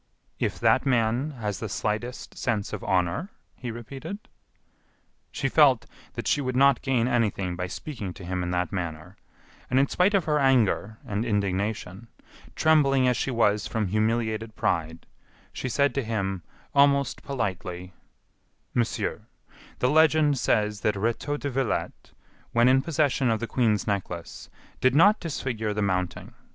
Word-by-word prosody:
"If - - -1
that - - +3
man 125 +2 +1
has 105 -3 -3
the 110 - -4
slightest 110 +6 -3
sense 110 -5 -2
of - - -5
honor," 95 - 0 0.3
he 125 - -6
repeated. 135 - -7 1.1
She - - -1
felt - - +4 0.3
that - - -4
she 145 - +2
would 130 -2 -2
not 140 -1 +4
gain 125 -3 +1
anything 100 -7 0
by 90 +1 -3
speaking 105 -1 -6
to 90 - -10
him 90 0 -2
in 90 - -2
that 90 0 -1
manner, 85 -5 -5 0.5
and 130 - +3
in 140 - +3
spite 190 +3 +2
of 190 -5 +2
her 150 -1 +2
anger 115 -5 +2
and 105 +2 -2
indignation, 100 -1 -2 0.5
trembling 140 -4 +4
as 125 - +3
she 130 - -1
was 105 -4 +2
from 110 -4 -2
humiliated 110 +1 -1
pride, 80 -3 -1 0.5
she 130 - -4
said 140 +3 +2
to 140 - -1
him, 95 -5 -2 0.3
almost 140 -1 +3
politely: 90 -7 -4 0.8
"Monsieur, 120 -1 -1 0.5
the 125 - +1
legend 155 -2 +4
says 105 -3 +1
that 105 +1 +1
Rétaux 115 +8 -1
de 140 - -3
Villette, 130 -2 -2 0.4
when 120 +1 +4
in 130 +1 +5
possession 140 -3 +1
of 110 -1 +1
the 115 - -2
Queen's 115 -4 +1
Necklace, 90 -5 -4 0.3
did 130 +1 +3
not 205 +7 +6
disfigure 115 -9 -3
the 105 - 0
mounting. 90 -2 -2
115 Hz, 150 wpm, -26 LUFS, 100-135 Hz, 1.1 s, not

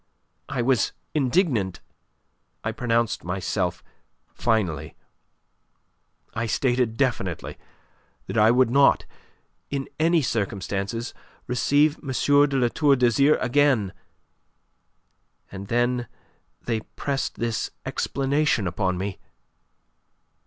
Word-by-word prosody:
I 125 - -1
was 125 -4 +2 0.2
indignant. 130 - +1 0.8
I 110 - -1
pronounced 115 -1 0
myself 90 0 -2 0.5
finally. 85 -10 -1 1.4
I 115 +1 -2
stated 120 -2 +1
definitely 105 - -2 0.7
that - - -6
I 110 0 +5
would 125 0 +4
not 140 +1 +4 0.6
in 140 -1 -3
any 165 0 +3
circumstances 100 +1 -2 0.3
receive 145 +5 +2
M. 150 - -11 0.4
de 135 - 0
La 125 -2 +2
Tour 145 +2 +3
d'Azyr 135 +4 +4
again! 125 -6 +2 1.6
And 100 0 -7
then 120 +1 0 0.6
they 115 -2 -1
pressed 135 +4 -4
this 115 -1 -2 0.2
explanation 140 -4 0
upon 90 +1 -1
me. 95 +1 -4
120 Hz, 95 wpm, -24 LUFS, 100-135 Hz, 1.6 s, I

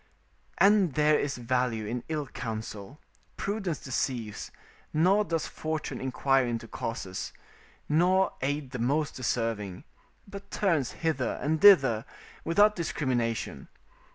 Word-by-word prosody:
["And 195 -7 +4
there 150 0 +4
is 140 -2 -2
value 120 -2 0
in 120 +3 -3
ill 155 -2 -2
counsel: 110 +1 -6 0.4
prudence 195 -6 -2
deceives: 120 -4 -3 0.4
nor 185 +7 +4
does 165 -5 -2
fortune 155 0 -4
inquire 135 +1 +2
into 115 -1 -3
causes, 110 -5 -5 0.6
nor 180 +5 +3
aid 140 0 -2
the 125 - -5
most 145 +6 0
deserving, 115 -6 -2 0.4
but 200 0 -10
turns 165 - 0
hither 140 -6 0
and 155 +1 0
thither 135 - +7 0.4
without 205 +5 +4
discrimination. 125 -9 -2
140 Hz, 115 wpm, -28 LUFS, 120-165 Hz, 0.6 s, thither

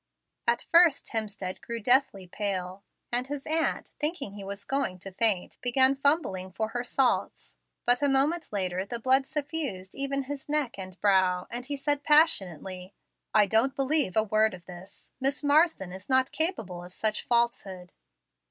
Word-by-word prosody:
At 235 0 +2
first 335 -4 +5
Hemstead 205 -4 -4
grew 235 -1 -5
deathly 245 -4 +2
pale, 185 0 -4 0.3
and 245 +2 +1
his 285 -1 -6
aunt, 320 +1 0
thinking 295 - -2
he 200 -1 -9
was 200 +1 -6
going 270 -9 -1
to 195 +2 -9
faint, 200 -2 +1
began 260 +2 +4
fumbling 275 - +1
for 220 +2 -2
her 240 +1 -3
salts. 255 +1 -1 0.3
But 245 +2 +3
a 285 - +2
moment 295 +5 +1
later 185 -2 -1
the 220 +4 -5
blood 260 +3 +2
suffused 285 - -4
even 275 0 -2
his 285 +1 -7
neck 290 -8 -1
and 185 -1 -9
brow, 185 -3 +3
and 245 +2 -5
he 285 -1 -4
said 290 +1 -1
passionately, 190 - +2 0.4
"I 210 -1 +5
don't 225 +7 +2
believe 275 - 0
a 220 - +4
word 215 -1 +1
of 175 -2 -16
this; 185 +2 -12
Miss 275 +3 -1
Marsden 290 - +2
is 190 +4 -10
not 260 0 +3
capable 225 - -2
of 180 +1 -8
such 215 -1 -1
falsehood." 205 -7 -1
235 Hz, 165 wpm, -27 LUFS, 190-275 Hz, 0.4 s, first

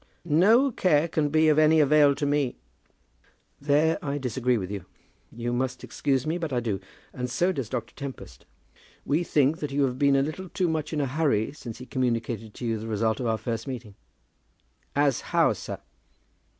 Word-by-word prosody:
"No 215 - +4
care 165 -7 +2
can 155 -2 0
be 155 +1 +3
of 155 0 +4
any 155 +1 +5
avail 145 -1 +5
to 145 +1 -2
me." 145 -3 0 1.1
"There 150 +4 +2
I 140 -2 -2
disagree 125 -2 0
with 95 -2 -4
you. 100 -3 -5 0.5
You 120 +1 -3
must 125 +1 -2
excuse 135 -2 -1
me, 165 +3 -1
but 165 -4 -3
I 125 - +1
do; 110 -5 -2 0.3
and 125 0 -4
so 175 +8 +1
does 135 - -4
Dr. 125 -2 -4
Tempest. 140 -2 -9 0.6
We 150 +5 +1
think 150 -1 +2
that 150 - -3
you 140 +1 +1
have 130 -1 -1
been 140 -1 +4
a 135 - +3
little 175 +5 -5
too 185 0 0
much 160 -2 -2
in 150 -2 -1
a - - +1
hurry 135 -6 0
since 120 -6 -8
he 125 - -9
communicated 115 -4 -2
to 125 - -6
you 115 -1 -1
the 110 - -6
result 110 0 0
of 125 - -2
our 110 -1 +1
first 115 +2 -4
meeting." 120 -6 -6 1.0
"As 140 -3 +2
how, - - +2
sir?" - - -6
140 Hz, 190 wpm, -26 LUFS, 120-155 Hz, 1.1 s, any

